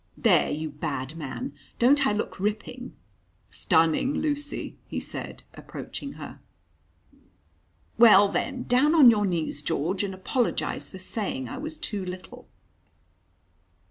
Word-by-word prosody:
"There, - - +4
you 155 +1 -3
bad 145 -1 -4
man! 145 -2 -5 0.2
Don't 275 +3 +4
I - - +2
look 210 -2 -3
ripping?" 215 +5 -3 0.6
"Stunning, 165 - +2
Lucy," 290 -1 -3
he - - -3
said, - - -7
approaching 280 -1 -7
her. - - -9 1.6
"Well, 205 -4 +8
then, 255 +5 -2
down 280 +6 +3
on 275 -7 +9
your 210 -2 +1
knees, 160 -5 -2
George, 170 +6 -1
and 195 -2 -3
apologise 235 +6 -1
for 190 - -10
saying 215 +7 -3
I 260 - -6
was 310 +2 -5
too 205 -8 -3
little." 180 0 -8
210 Hz, 125 wpm, -26 LUFS, 170-260 Hz, 1.6 s, on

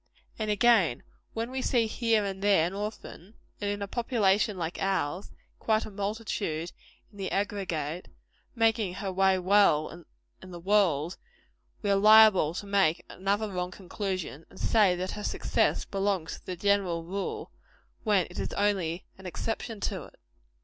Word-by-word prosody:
And 215 -1 -2
again, 210 - +3 0.3
when 230 +2 -3
we 260 0 -2
see 240 -3 +2
here 225 -1 +1
and 195 -1 -4
there 200 -5 +4
an 175 - -3
orphan 210 -1 -7 0.3
and 205 - -1
in 205 0 -2
a - - -4
population 210 -3 +1
like 170 0 -4
ours, 190 -2 -1 0.3
quite 220 0 +1
a - - -8
multitude 200 -5 -3 0.4
in 205 - -16
the 190 - -2
aggregate 180 -5 -2 0.5
making 225 -5 +1
her 195 -1 -3
way 190 0 +3
well 180 -4 +3 0.4
in 185 - -11
the 175 -1 -8
world, 180 -4 +2 0.7
we 205 - +1
are - - +4
liable 210 -6 +6
to 205 - -5
make 195 -5 +2
another 200 +3 -1
wrong 180 -1 -2
conclusion, 185 -4 -5
and - - -16
to - - -4
say 205 -5 +4
that 185 +1 -3
her 210 - -6
success - - 0
belongs 195 -4 -2
to - - -30
the 185 - -3
general 190 -3 +1
rule, 190 +4 -4 0.5
when 205 -5 +3
it - - -8
is - - -3
only 190 -4 0
an 190 - -8
exception 225 +3 -4
to - - -3
it. - - -19
195 Hz, 165 wpm, -28 LUFS, 180-210 Hz, 0.7 s, liable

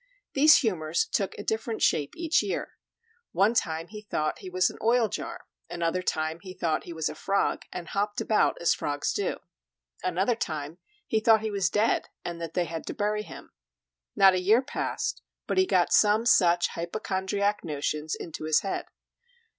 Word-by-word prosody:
These 305 +3 +7
humors 170 - 0
took 195 -2 -2
a 205 - -6
different 220 +1 -2
shape 145 -2 +1
each 330 -1 +2
year; - - -4 0.5
one 200 +4 +3
time 165 -6 -1
he 210 0 -8
thought 155 -7 -2
he 190 - -8
was 185 0 +2
an - - -14
oil 230 +1 +3
jar; - - -5 0.3
another 170 +1 -1
time 160 -2 -2
he 185 -1 -10
thought 160 -3 -1
he - - -8
was 160 -2 -2
a - - -4
frog, 195 +6 -1
and 175 -2 -6
hopped 205 +1 -1
about 215 - +2
as 170 - +3
frogs 145 0 -2
do; - - -1 0.7
another 185 +6 +1
time 155 -4 -4 0.3
he 220 - +1
thought 220 0 +5
he 220 -1 -2
was 200 -3 +1
dead, 215 +2 +1 0.2
and 170 -1 -5
then 165 - -3
they 180 - +1
had 165 -1 -6
to - - -4
bury 210 -2 0
him; - - -11 0.6
not 195 -2 +7
a 185 - 0
year 220 +7 +4
passed 440 - -3 0.2
but - - 0
he 375 - +4
got - - +2
some 215 +2 +4
such 175 -7 +4
hypochondriac 200 +3 -2
notions 150 +1 -2
into 160 -2 -7
his 155 -1 +3
head. 195 - -3
190 Hz, 180 wpm, -27 LUFS, 165-215 Hz, 0.7 s, These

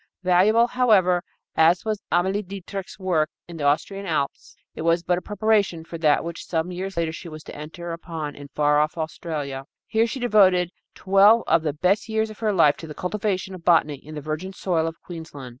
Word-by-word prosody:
Valuable, 195 +6 +4
however, 210 -8 +3 0.3
as 170 +4 +4
was 215 -2 -2
Amalie 190 +4 +2
Dietrich's 195 0 -7
work 175 -5 +1 0.2
in 170 -1 -9
the 145 - -3
Austrian 195 +7 0
Alps, 150 -4 -2 0.2
it - - -7
was 165 +1 +2
but 180 0 +1
a - - -18
preparation 205 -5 +1
for 165 0 -8
that 150 -3 +3
which 170 0 -6
some 165 +1 -2
years 190 +1 -5
later 165 -1 0
she 170 - -8
was 155 -1 -9
to - - -10
enter 165 +3 -7
upon 165 -3 -5
in 145 0 -10
far 150 +1 +2
off 155 +2 0
Australia. 150 -4 -4 0.2
Here 225 +1 +1
she 260 - -5
devoted 190 -7 +4 0.2
twelve 200 +4 +5
of 165 0 +3
the 155 -2 -1
best 185 +8 +1
years 220 0 0
of 215 - -13
her 220 -2 +1
life 165 -7 +4
to 165 - -9
the 150 - -8
cultivation 190 0 -2
of 180 -2 -10
botany 160 -4 +3
in 155 +1 -10
the 150 - -5
virgin 155 +6 -4
soil 170 -4 0
of 165 0 -6
Queensland. 160 -6 -8
175 Hz, 205 wpm, -24 LUFS, 160-195 Hz, 0.3 s, twelve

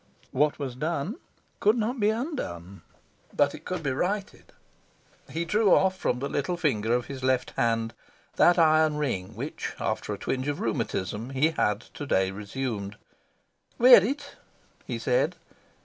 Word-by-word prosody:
What 150 +3 +2
was 135 -4 -4
done 155 - -2 0.4
could 215 +4 +3
not 235 +3 -1
be 210 0 +3
undone; 215 - -4 0.5
but 145 0 +3
it 155 - -11
could 180 -3 -4
be 135 - 0
righted. 195 +9 -3 0.8
He 170 +1 -2
drew 210 +2 +4
off 190 0 +3
from 125 - -1
the 135 +3 -3
little 145 +6 -2
finger 115 -10 0
of 125 -1 -1
his 135 -2 -8
left 130 -1 +1
hand 115 -1 0 0.4
that 175 - +5
iron 155 -2 +4
ring 110 -9 -2
which, 135 +8 -5
after - - -2
a - - -3
twinge 130 +1 -2
of 145 0 -2
rheumatism, 105 0 -2
he 135 +4 +2
had 105 -9 0
to 145 - -6
day 95 -5 +2
resumed. 105 0 -4 0.8
"Wear 250 +1 +9
it," 285 +6 -4 0.5
he - - -3
said. - - +1
145 Hz, 155 wpm, -27 LUFS, 115-185 Hz, 0.8 s, Wear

